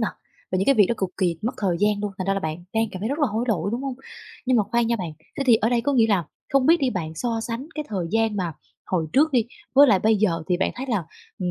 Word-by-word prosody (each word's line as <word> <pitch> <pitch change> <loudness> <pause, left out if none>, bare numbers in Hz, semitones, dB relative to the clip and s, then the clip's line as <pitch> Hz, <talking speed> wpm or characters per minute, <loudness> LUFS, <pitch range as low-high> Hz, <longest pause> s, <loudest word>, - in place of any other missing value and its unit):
nà? - - +1 0.4
Và 185 - +2
những 195 - 0
cái 275 - +5
việc 205 -4 +5
đó 235 - 0
cực 190 -2 -1
kỳ 175 -4 +1
mất 235 - -1
thời 185 -4 0
gian 205 0 +2
luôn, 205 -1 -3
thành 185 - -3
ra 195 - +2
là 195 - -1
bạn 160 +2 -4
đang 225 0 +2
cảm 185 - -6
thấy 215 - -2
rất 285 +3 -2
là 290 - +3
hối 220 +2 -1
lỗi, 200 -3 0
đúng 245 +3 -2
hông? 270 -2 -3 0.5
Nhưng 255 -1 +3
mà 215 - +4
khoan 235 -1 +2
nha 235 0 +1
bạn. 175 -6 -5 0.3
Thế - - +1
thì 235 -3 +7
ở 220 +1 +1
đây 240 -1 +2
có 285 +3 0
nghĩa 230 -4 +4
là 195 -6 +1 0.3
không 275 -2 +3
biết 335 +2 +7
đi, 260 -2 +2
bạn 160 -5 -4
so 230 +5 -2
sánh 235 +4 -4
cái 305 -1 -3
thời 185 -5 -2
gian 225 -1 +1
mà 175 -4 -2 0.3
hồi 170 -4 0
trước 300 +2 +4
đi, 240 -3 +2 0.3
với 285 +1 +8
lại 200 -6 +5
bây 220 +2 +3
giờ 175 -6 +1
thì 180 - +2
bạn 190 - 0
thấy 260 +2 -5
là, 215 -9 -1 0.3
ừm, 180 -2 -1
220 Hz, 310 wpm, -24 LUFS, 185-245 Hz, 0.5 s, với